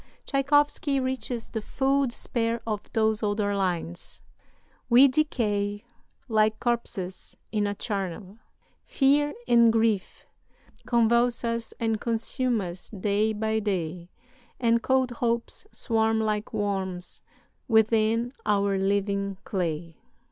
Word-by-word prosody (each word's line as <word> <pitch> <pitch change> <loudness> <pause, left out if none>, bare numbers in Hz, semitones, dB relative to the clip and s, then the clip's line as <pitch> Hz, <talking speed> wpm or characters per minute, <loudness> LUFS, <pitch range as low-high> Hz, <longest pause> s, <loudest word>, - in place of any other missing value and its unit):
Tschaikowsky 285 0 +2
reaches 255 -2 -3
the 220 - -4
full 270 +4 +1
despair 235 -1 -2
of 210 -2 -4
those 220 -1 +2
other 205 -1 0
lines 175 -3 -3 0.7
"'We 260 +3 +8
decay 210 -8 0 0.4
Like 215 -2 +2
corpses 225 -6 -3
in 210 -2 +1
a 205 - -2
charnel; 195 0 -4 0.4
fear 290 +2 +2
and 235 -1 +6
grief 225 -3 0 0.6
Convulse 235 0 +3
us 230 -1 -2
and 225 -2 0
consume 235 +1 0
us 175 -1 -7
day 210 +1 0
by 220 +1 -1
day, 180 -4 -3 0.5
And 235 -1 +3
cold 260 0 +2
hopes 235 - -2
swarm 225 -1 +1
like 215 -1 -1
worms 190 -3 -3 0.5
within 225 +1 +3
our 200 -2 +1
living 200 0 0
clay.' 165 -3 -3
220 Hz, 110 wpm, -26 LUFS, 200-235 Hz, 0.7 s, We